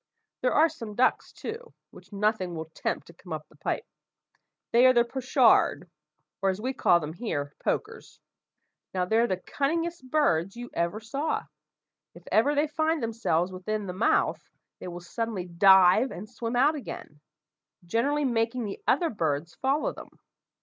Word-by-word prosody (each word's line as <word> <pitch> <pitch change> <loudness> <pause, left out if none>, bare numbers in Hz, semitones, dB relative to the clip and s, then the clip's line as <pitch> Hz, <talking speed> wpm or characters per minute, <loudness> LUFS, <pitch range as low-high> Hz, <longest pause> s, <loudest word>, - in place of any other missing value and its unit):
There 250 - +2
are 315 +2 +6
some 230 -10 -8
ducks, 255 +3 +2
too, 460 +2 -8 0.2
which - - -16
nothing 200 -3 0
will 160 0 -6
tempt - - -3
to 170 - -15
come 175 +1 -15
up 155 -1 -5
the - - -22
pipe. - - -3 0.9
They 245 +2 +6
are 255 - +6
the 240 -1 +5
pochard, 255 +1 +3 0.5
or, 195 - +2
as 190 +1 -2
we 255 +4 -2
call 175 -8 +4
them 155 -1 -6
here, 145 - -4
pokers. - - -3 0.8
Now 180 -1 +1
they're 225 +5 +3
the 185 - -1
cunningest 310 - -2
birds 195 - +1
you 240 0 -7
ever 170 +5 -1
saw! 275 +8 -2 0.7
If - - -14
ever 280 +7 +3
they 290 +2 +3
find 315 -1 0
themselves 190 -6 0
within 205 +3 -3
the 180 - -5
mouth, 190 +5 +1 0.4
they - - -7
will 175 0 -7
suddenly 210 +1 -4
dive 190 +6 +6
and 210 -1 -8
swim 230 +1 -4
out 280 +5 +4
again, 240 - -8 0.7
generally 280 +10 +1
making 235 0 0
the 200 - -6
other 330 +5 +2
birds 160 -5 -2
follow 275 +3 0
them. - - -11
225 Hz, 165 wpm, -27 LUFS, 180-265 Hz, 0.9 s, are